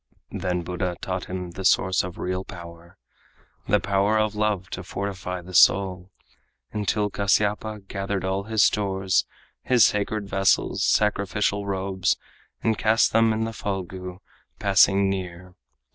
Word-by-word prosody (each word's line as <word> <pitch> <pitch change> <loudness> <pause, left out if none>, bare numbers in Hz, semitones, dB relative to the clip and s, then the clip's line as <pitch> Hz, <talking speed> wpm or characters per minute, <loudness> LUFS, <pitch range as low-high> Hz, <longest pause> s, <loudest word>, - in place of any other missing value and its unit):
Then 90 -1 -2
Buddha 90 0 -3
taught 95 -1 -4
the 90 0 -6
source 95 0 +3
of 90 -1 -7
real 95 +1 -3
power, 85 -2 -12 0.7
The - - +3
power 100 +2 +1
of 110 -1 +1
love 105 -3 -1
to 90 - -5
fortify 95 -1 -5
the 90 +1 -11
soul, 90 0 +4 0.6
Until 105 0 -1
Kasyapa 105 +2 0
gathered 95 -1 -3
all 95 +1 -2
his 110 -1 +2
stores, 95 -2 +1 0.3
His 125 -3 +5
sacred 105 0 -1
vessels, 95 0 +1
sacrificial 100 -1 +1
robes, 95 -1 0 0.5
And 110 -2 +1
cast 110 +1 +3
them 115 0 +4
in 110 0 -1
the 115 0 -3
Phalgu 95 -2 -5 0.4
passing 100 0 +4
near. 90 -2 -5
95 Hz, 130 wpm, -24 LUFS, 90-105 Hz, 0.7 s, His